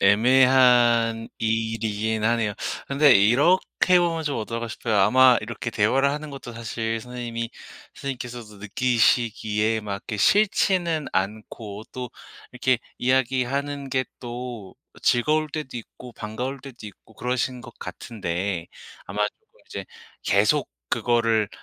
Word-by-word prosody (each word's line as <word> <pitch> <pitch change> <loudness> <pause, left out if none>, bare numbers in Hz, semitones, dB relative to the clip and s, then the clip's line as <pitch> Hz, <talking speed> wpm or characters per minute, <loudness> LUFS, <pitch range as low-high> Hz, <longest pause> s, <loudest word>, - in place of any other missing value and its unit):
애매한 120 0 +5
일이긴 110 -1 -1
하네요. 115 -3 +1 0.3
근데 140 -1 +5
이렇게 145 - +4
보면 165 -2 0
좀 145 -2 -1
어떨까 115 +1 -4
싶어요. 110 -1 -2
아마 125 +5 +6
이렇게 115 +2 -5
대화를 130 +6 +2
하는 150 +1 -5
것도 135 -3 -8
사실 115 0 -3
선생님이 115 -1 -5 0.4
선생님께서도 120 -5 -7
느끼시기에 110 -1 +1
막 105 -1 -5
이렇게 105 +2 -6
싫지는 175 - +2
않고 105 +2 -4
또 125 -2 -6 0.4
이렇게 125 0 +1 0.2
이야기하는 130 +2 0
게 130 0 +1 0.2
또 120 -5 -7 0.3
즐거울 155 +5 +2
때도 145 -4 -5
있고 120 +1 -10
반가울 125 +6 -5
때도 130 -5 -11
있고 105 +2 -15
그러신 125 +2 -2
것 - - -11
같은데 90 -4 -4 0.4
아마 105 +2 0
쪼끔 - - -26
이제 - - -6 0.4
계속 - - +3 0.2
그거를 115 -3 +2
120 Hz, 290 characters per minute, -24 LUFS, 110-130 Hz, 0.4 s, 아마